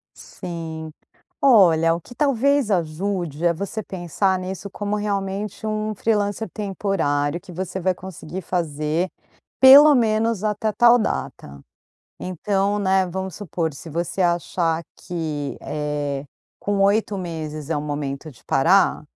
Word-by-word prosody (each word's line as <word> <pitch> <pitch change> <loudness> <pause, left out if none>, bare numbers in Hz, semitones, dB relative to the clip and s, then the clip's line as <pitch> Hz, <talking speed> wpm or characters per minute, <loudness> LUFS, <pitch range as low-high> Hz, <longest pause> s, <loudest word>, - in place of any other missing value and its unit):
Sim. 160 -2 -7 0.5
Olha, 170 -11 +5
o 170 - -3
que 245 - -14
talvez 280 -3 +2
ajude 175 -2 -1
é 170 - +4
você 200 +5 -4
pensar 185 +1 -1
nisso 190 +2 -6
como 205 +1 -3
realmente 205 0 -3
um 215 0 -2
freelancer 210 0 -1
temporário, 175 -7 -1
que 190 - -12
você 180 +1 -4
vai 185 +1 +2
conseguir 185 0 -8
fazer, 160 0 -1 0.5
pelo 285 +3 +10
menos 225 -3 +1
até 215 0 0
tal 235 +3 +6
data. 70 - -4 0.6
Então, 195 +3 -1
né, 190 -1 +2
vamos 190 +1 -5
supor, 170 -5 -3
se 150 +4 -10
você 170 +4 -2
achar 170 -1 0
que, 155 -5 -4
eh, 145 -2 -3 0.3
com 205 -1 -1
8 200 +1 +2
meses 155 -4 -5
é 160 - 0
um - - -2
momento 145 0 -4
de 125 - -20
parar, - - +3
185 Hz, 130 wpm, -22 LUFS, 160-205 Hz, 0.6 s, pelo